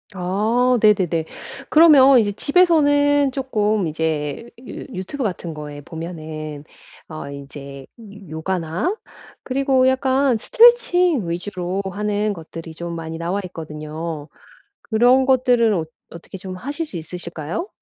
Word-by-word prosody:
아 220 +7 +1
네네네. 185 -7 +3 0.4
그러면 280 -5 +7
이제 205 -2 +1
집에서는 290 - +3
쪼끔 215 -7 0
이제 155 +5 -3 0.2
유 - - -8 0.2
유튜브 245 +9 -4
같은 175 -4 -3
거에 150 -1 -8
보면은 155 -2 -7 0.5
어 155 -3 -7
인제 140 -1 -9
요 205 -5 -13
요가나 180 - -2 0.5
그리고 265 -1 +2
약간 260 -1 +2
스트레칭 360 - +4
위주로 180 +1 -3
하는 210 +1 -1
것들이 165 -1 -9
좀 170 +1 -6
많이 165 0 -6
나와 175 +4 -2
있거든요. 155 -2 -6 0.6
그런 245 +4 +4
것들은 245 -4 +3
어 170 - 0 0.3
어떻게 170 +3 -10
좀 185 0 -7
하실 290 - -4
수 250 - -11
있으실까요? 170 - -5
195 Hz, 265 characters per minute, -21 LUFS, 160-260 Hz, 0.6 s, 그러면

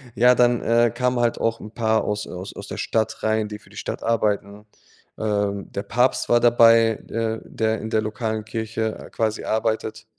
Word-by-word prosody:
Ja, 125 +1 +5
dann, 120 -1 +3
äh, 115 +1 +3
kamen 125 0 0
halt 120 -1 +1
auch 115 0 0
'n 105 - -9
paar 110 -1 +1
aus, 105 0 -2
äh - - -12
aus 90 +2 -7
aus - - -9
der - - -6
Stadt 110 -1 -1
rein, 110 0 +1
die 105 0 -8
für - - -21
die - - -15
Stadt - - -5
arbeiten. 105 -2 -1 0.5
Ähm, 100 -2 -2
der 100 - -4
Papst 125 +5 +1
war 120 - +4
dabei, 115 -2 +5
äh, 115 -1 -2
der 110 0 -1
in 110 - -5
der 110 - +1
lokalen 110 0 -3
Kirche, 110 0 -3
äh, - - -17
quasi 110 -1 -2
arbeitet 110 0 -2
110 Hz, 200 wpm, -23 LUFS, 110-115 Hz, 0.5 s, Ja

